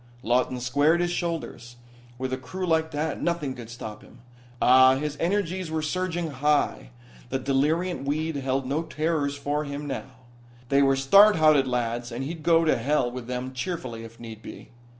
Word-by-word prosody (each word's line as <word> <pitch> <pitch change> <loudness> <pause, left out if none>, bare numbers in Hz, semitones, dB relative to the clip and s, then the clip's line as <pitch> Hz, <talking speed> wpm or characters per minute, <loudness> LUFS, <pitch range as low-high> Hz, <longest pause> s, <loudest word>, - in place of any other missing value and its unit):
Lawton 125 +1 +1
squared 145 +7 +2
his 175 0 0
shoulders. 165 -9 -4 0.4
With 130 +1 -3
a - - -1
crew 165 +9 -5
like 160 -2 +1
that 150 0 -3
nothing 170 -6 -1
could 120 -3 -10
stop 110 -2 -8
him! - - -17 0.4
Ah, 130 +1 +6
his 150 +1 -3
energies 185 -1 -1
were 160 -1 -2
surging 175 0 -2
high. 140 - 0 0.4
The - - -1
deliriant 145 +5 0
weed 155 +2 -1
held 135 0 -1
no 140 +5 -1
terrors 155 -3 -1
for 145 +1 -2
him 145 0 -5
now. 130 -2 -7 0.4
They 140 0 +4
were 135 -1 +4
stout 200 +11 +6
hearted 155 -4 +4
lads 120 -1 -2
and 120 +3 -4
he'd 160 +3 -6
go 165 +1 +4
to 155 - +3
hell 130 0 0
with 125 -1 -7
them 125 +1 -4
cheerfully, 130 -6 -4
if 115 0 -12
need 110 -2 -9
be. - - -11
140 Hz, 175 wpm, -26 LUFS, 125-160 Hz, 0.4 s, Ah